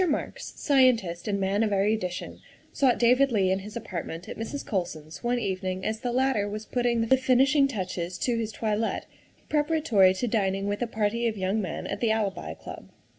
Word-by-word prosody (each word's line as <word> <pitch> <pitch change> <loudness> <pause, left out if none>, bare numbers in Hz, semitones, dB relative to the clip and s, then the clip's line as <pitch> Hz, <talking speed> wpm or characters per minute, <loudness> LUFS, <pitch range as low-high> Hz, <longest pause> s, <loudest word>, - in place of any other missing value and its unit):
MARKS, 290 - -3
scientist 235 - +2
and 200 -1 0
man 195 +2 +1
of 220 -2 +1
erudition, 195 -2 -1 0.3
sought 260 -4 +3
David 250 +3 +4
Leigh 195 -4 +2
in 190 - +1
his 210 +2 -9
apartment 175 -5 -6
at - - -6
Mrs. 230 +6 -5
Colson's 170 -4 -4
one 240 +1 +1
evening 185 -4 -2
as 220 0 -1
the 245 - -2
latter 250 -5 +1
was 215 +1 -5
putting 240 -2 0
the 265 +3 +4
finishing 265 +2 +4
touches 185 -6 -4
to 245 - 0
his 225 -1 -2
toilet 220 0 -1 0.4
preparatory 295 - +3
to 220 - -1
dining 195 -3 0
with 205 +2 -2
a 240 - 0
party 225 +1 0
of 220 -2 -2
young 195 +3 0
men 180 -5 -4
at - - -4
the 230 - +1
Alibi 215 -3 -1
Club. - - -10
215 Hz, 185 wpm, -27 LUFS, 190-245 Hz, 0.4 s, David